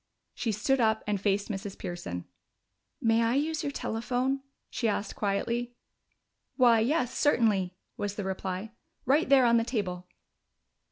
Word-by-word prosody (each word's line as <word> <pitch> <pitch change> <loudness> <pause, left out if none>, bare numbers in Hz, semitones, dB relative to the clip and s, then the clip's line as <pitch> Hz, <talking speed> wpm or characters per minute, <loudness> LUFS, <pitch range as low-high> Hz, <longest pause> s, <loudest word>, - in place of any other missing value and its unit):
She 230 - -1
stood 245 +6 +1
up 220 -1 +2
and 205 -2 -1
faced 200 0 +1
Mrs. 195 -1 -5
Pearson. 175 - -5 0.7
"May 225 0 +3
I 230 +2 +2
use 310 +2 0
your 285 - -2
telephone?" 255 +3 -1 0.3
she 235 - -1
asked 210 0 -2
quietly. 235 +4 -1 0.8
"Why, 240 -4 +5
yes, 250 +2 +1
certainly," 205 -10 +2 0.2
was 205 -1 -3
the 205 - -3
reply. 190 +2 -4 0.3
"Right 280 +3 +3
there 270 -2 +6
on 235 0 +5
the 230 - +2
table." 185 -7 -3
225 Hz, 145 wpm, -29 LUFS, 200-250 Hz, 0.8 s, there